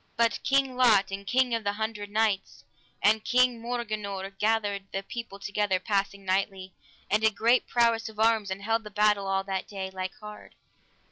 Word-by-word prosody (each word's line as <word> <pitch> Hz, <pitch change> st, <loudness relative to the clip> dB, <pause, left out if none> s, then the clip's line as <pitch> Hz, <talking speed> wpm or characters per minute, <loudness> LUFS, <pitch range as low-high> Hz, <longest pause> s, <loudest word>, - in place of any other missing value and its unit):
But 230 Hz, -1 st, +2 dB
King 270 Hz, -1 st, +1 dB
Lot, 220 Hz, -7 st, +4 dB
and 200 Hz, 0 st, -6 dB
King 250 Hz, -1 st, +2 dB
of 230 Hz, -1 st, -1 dB
the 200 Hz, 0 st, 0 dB
Hundred 215 Hz, -1 st, -4 dB
Knights, 210 Hz, -2 st, -1 dB, 0.4 s
and 215 Hz, +1 st, +4 dB
King 250 Hz, -2 st, +2 dB
Morganore 210 Hz, -5 st, -4 dB
gathered 205 Hz, -2 st, 0 dB
the 195 Hz, -, -3 dB
people 230 Hz, -1 st, -7 dB
together 200 Hz, -1 st, -1 dB
passing 200 Hz, 0 st, -2 dB
knightly, 190 Hz, 0 st, -1 dB, 0.4 s
and 210 Hz, +1 st, +3 dB
did 220 Hz, -1 st, +2 dB
great 235 Hz, +4 st, +3 dB
prowess 230 Hz, -2 st, +2 dB
of 215 Hz, -1 st, -13 dB
arms, 220 Hz, -2 st, +3 dB
and 190 Hz, +1 st, -5 dB
held 225 Hz, +1 st, 0 dB
the 210 Hz, -, -8 dB
battle 210 Hz, -1 st, +2 dB
all 195 Hz, 0 st, 0 dB
that 195 Hz, -1 st, -3 dB
day, 190 Hz, -2 st, -5 dB
like 185 Hz, 0 st, -5 dB
hard. 210 Hz, 0 st, -11 dB
210 Hz, 180 wpm, -27 LUFS, 195-230 Hz, 0.4 s, Lot